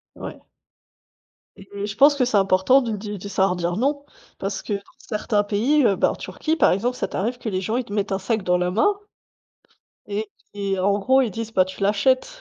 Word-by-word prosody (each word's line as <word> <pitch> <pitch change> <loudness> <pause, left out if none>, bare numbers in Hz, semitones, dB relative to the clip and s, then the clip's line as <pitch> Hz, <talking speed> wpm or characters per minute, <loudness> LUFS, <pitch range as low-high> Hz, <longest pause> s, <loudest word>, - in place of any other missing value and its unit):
Ouais - - -9 1.1
et 200 +1 -7
je 205 0 -6
pense 285 +5 +6
que 265 - +2
c'est 240 -3 0
important 195 +7 +4
de 235 - -3
di 205 0 -5
de 200 - -8
savoir 190 -1 +1
dire 175 0 -2
«non» 280 +5 0 0.3
parce 195 0 -3
que - - -5
dans 200 - -3 0.2
certains 210 -1 -1
pays, 240 +9 +2
heu, 200 -4 +3
bah - - +2
en - - -3
Turquie, 320 +1 -3
par - - +4
exemple, 240 +7 -1
ça - - -2
t'arrive 235 +6 -2
que 235 - -5
les 185 -3 -1
gens 215 +5 -2
ils 255 - -1
te 205 - -11
mettent 205 0 -1
un 195 - 0
sac 215 +2 -1
dans 180 -1 +2
la 180 0 0
main 215 - +3 1.2
et 210 +1 -3 0.2
et 200 -1 -2
en 200 +2 +2
gros 260 +6 +4
ils 240 -5 -1
disent: 225 +3 -6
«Bah, 185 -2 +4
tu 190 +1 -10
l'achètes». 210 - +2
205 Hz, 220 wpm, -23 LUFS, 195-240 Hz, 1.2 s, pense